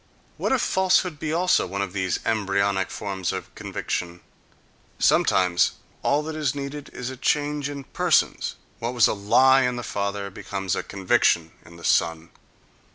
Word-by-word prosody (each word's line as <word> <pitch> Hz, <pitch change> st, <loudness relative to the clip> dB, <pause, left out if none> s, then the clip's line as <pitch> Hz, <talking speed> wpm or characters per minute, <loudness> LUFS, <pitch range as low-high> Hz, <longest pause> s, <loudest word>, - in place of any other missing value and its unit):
What -, -, -1 dB
if 265 Hz, -3 st, +2 dB
falsehood 185 Hz, -4 st, +2 dB
be 155 Hz, -, -3 dB
also 175 Hz, -, +2 dB
one 100 Hz, +2 st, -2 dB
of 95 Hz, -2 st, -6 dB
these 95 Hz, -2 st, 0 dB
embryonic 100 Hz, -3 st, +1 dB
forms 95 Hz, -3 st, -3 dB
of -, -, -6 dB
conviction?—Sometimes 90 Hz, 0 st, -1 dB, 0.3 s
all 145 Hz, +2 st, +1 dB
that 160 Hz, 0 st, -5 dB
is 150 Hz, -4 st, -1 dB
needed 140 Hz, +1 st, -6 dB
is 125 Hz, +1 st, -5 dB
a 130 Hz, -, -9 dB
change 145 Hz, +2 st, 0 dB
in 140 Hz, -1 st, -6 dB
persons: -, -, +1 dB, 0.2 s
what 120 Hz, +2 st, -3 dB
was 120 Hz, -, +6 dB
a -, -, 0 dB
lie 130 Hz, +6 st, +5 dB
in 125 Hz, -1 st, +1 dB
the 120 Hz, -, -5 dB
father 100 Hz, -1 st, -3 dB
becomes 95 Hz, -1 st, -3 dB
a -, -, -1 dB
conviction 90 Hz, -4 st, +1 dB
in 85 Hz, 0 st, -15 dB
the 85 Hz, -, -14 dB
son. 80 Hz, 0 st, +1 dB
105 Hz, 160 wpm, -24 LUFS, 95-145 Hz, 0.3 s, was